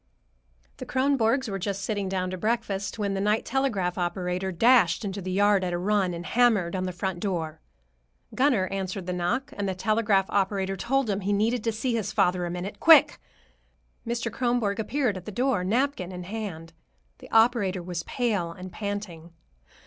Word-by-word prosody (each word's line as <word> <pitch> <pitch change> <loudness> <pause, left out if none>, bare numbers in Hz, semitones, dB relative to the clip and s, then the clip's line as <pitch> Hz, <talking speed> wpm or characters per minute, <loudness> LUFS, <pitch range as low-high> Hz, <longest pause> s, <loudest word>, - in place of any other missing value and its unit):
The - - -7
Kronborgs 260 -1 +1
were 195 -2 -3
just 195 +1 -3
sitting 200 -1 -2
down 185 -1 -2
to - - -3
breakfast, 210 -3 -2
when 200 -2 -1
the 195 - -2
night 210 +2 +1
telegraph 205 -10 -1
operator 180 +1 -2
dashed 215 -1 +4
into 195 0 -4
the 185 - -5
yard 200 0 +3
at 180 -1 -2
a - - 0
run 190 -1 +1
and 170 +1 -7
hammered 220 -8 +2
on 185 0 -1
the 185 - -2
front 180 0 -3
door. 165 -5 -3 0.7
Gunner 255 -8 +2
answered 190 -1 -4
the 180 - -3
knock, 210 +10 -2
and 200 -1 -2
the 190 - -2
telegraph 210 0 +2
operator 195 -1 0
told 270 +6 0
him 200 -2 0
he 195 +2 -1
wanted 225 +3 +1
to 230 - +1
see 225 +3 -2
his 225 -4 -1
father 180 0 +1
a - - -4
minute, 180 +3 -5
quick. 325 -1 +6 0.9
Mr. 235 -1 -2
Kronborg 240 -4 0
appeared 230 -1 0
at 185 - -10
the 215 - -6
door, 245 -3 0
napkin 225 -2 0
in 180 -1 -7
hand. 175 -5 -6 0.5
The - - -13
operator 225 -5 +3
was 175 -1 -4
pale 205 -7 -1
and 185 +2 -9
panting. 195 -5 -5
200 Hz, 180 wpm, -26 LUFS, 185-225 Hz, 0.9 s, quick